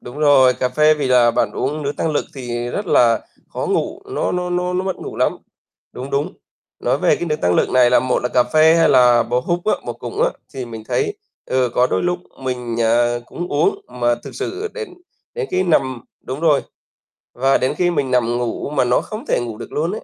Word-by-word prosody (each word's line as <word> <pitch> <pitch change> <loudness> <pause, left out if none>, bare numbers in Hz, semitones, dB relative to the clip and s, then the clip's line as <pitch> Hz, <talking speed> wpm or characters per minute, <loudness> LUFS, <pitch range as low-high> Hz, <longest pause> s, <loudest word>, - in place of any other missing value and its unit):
Đúng 125 +4 -10
rồi, 140 -4 +5
cà 125 - -1
phê, 155 +4 +4
vì 145 -3 -2
là 125 -2 +5
bạn 105 -2 0
uống 150 +3 -2
nước 140 +1 -2
tăng 160 - -1
lực 150 - 0
thì 120 -2 -4
rất 200 +11 -4
là 115 -8 +4 0.3
khó - - -3
ngủ, - - -2
nó - - -2
nó 180 0 -2
nó 180 0 -1
nó 185 +1 -1
mất 190 - -2
ngủ - - -8
lắm. - - +1 0.6
Đúng, 130 +2 -7
đúng. 145 +7 -1 0.5
Nói - - +1
về - - +3
cái - - -3
nước 150 -2 -1
tăng 90 0 +3
lực - - +2
này 125 -1 +4
là 125 - +5
một 130 0 0
là 125 - 0
cà 125 -1 +3
phê, 155 +5 +4
hai 165 - +4
là 125 -2 +5
bò 125 +1 -1
húc 175 +6 -2
á - - +3
bò - - -2
cụng 420 +3 -4
á, - - +3 0.2
thì 130 -2 -4
mình 115 -2 -9
thấy, 420 - -1 0.3
ừ, 130 -1 +1
có 125 - +4
đôi 95 - -1
lúc 175 0 0 0.3
mình, 125 -2 -3
à, 120 +1 +2
cũng 175 +1 -6
uống, 145 +3 +1
mà 120 -1 0
thực 130 +1 -11
sự 400 +4 -4
đến 450 -4 -5 0.5
đến 475 -3 -3
khi 185 - +1
nằm 130 -8 +1 0.2
đúng 130 +3 -6
rồi, 155 -4 +3 0.7
và 135 +2 +2
đến 130 +3 -1
khi 175 +2 +1
mình 140 -5 -1
nằm 120 -1 +1
ngủ 120 +3 -3
mà 150 - +1
nó 125 0 +2
không 215 +5 -8
thể - - +1
ngủ 110 -2 -7
được - - -9
luôn 165 +4 -1
ấy, 220 - -6
130 Hz, 235 wpm, -19 LUFS, 125-170 Hz, 0.7 s, rồi